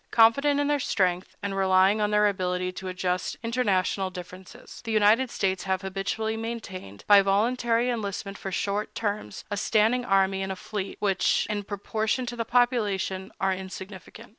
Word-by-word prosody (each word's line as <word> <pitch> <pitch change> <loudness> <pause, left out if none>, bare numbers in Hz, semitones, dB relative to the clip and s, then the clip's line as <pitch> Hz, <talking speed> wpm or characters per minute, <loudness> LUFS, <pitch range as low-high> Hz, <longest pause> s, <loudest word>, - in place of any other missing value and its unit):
Confident 280 +6 +4
in 290 - +1
their 290 0 +1
strength, 185 -7 0
and 200 -1 -2
relying 190 +2 +4
on 210 - +2
their 210 0 +3
ability 180 -2 -1
to 185 +1 -7
adjust 180 0 -2
international 200 -5 0
differences, 185 +5 -11
the 225 - -4
United 220 +4 +4
States 190 -4 -1
have 190 0 -1
habitually 195 +3 -2
maintained, 200 - -6
by 205 -1 +7
voluntary 230 +4 +1
enlistment 200 -4 -3
for 195 - -6
short 200 +2 -2
terms, 210 -1 -3
a 205 - -1
standing 220 +4 +2
army 195 -3 +2
and 190 0 -3
a - - -3
fleet 195 +1 -5
which, 195 -2 +2
in 205 -1 -1
proportion 215 +4 -2
to 240 0 -5
the 230 -1 -3
population, 215 -6 +1
are 190 0 +2
insignificant. 190 +4 -9
200 Hz, 165 wpm, -26 LUFS, 190-225 Hz, -, by